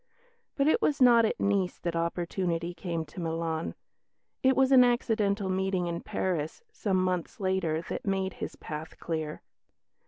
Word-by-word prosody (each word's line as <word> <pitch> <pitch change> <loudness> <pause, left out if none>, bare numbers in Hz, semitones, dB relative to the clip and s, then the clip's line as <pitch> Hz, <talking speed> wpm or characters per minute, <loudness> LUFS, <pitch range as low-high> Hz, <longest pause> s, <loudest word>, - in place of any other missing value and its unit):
But 280 0 +2
it 380 +9 +3
was 295 - +2
not 240 -3 +7
at - - -1
Nice 200 -3 +1
that 170 -1 -3
opportunity 170 0 -1
came 170 -3 -3
to 150 +5 -10
Milan. 165 -1 -2 0.7
It 265 0 +4
was 265 0 +3
an 255 -2 +8
accidental 215 -5 +1
meeting 190 -1 0
in 170 0 -3
Paris, 165 - -2
some 200 - 0
months 185 -2 -1
later, 185 -4 0
that - - -5
made 190 -2 -1
his - - -4
path 155 +1 -7
clear. 160 -2 -4
185 Hz, 155 wpm, -29 LUFS, 165-205 Hz, 0.7 s, an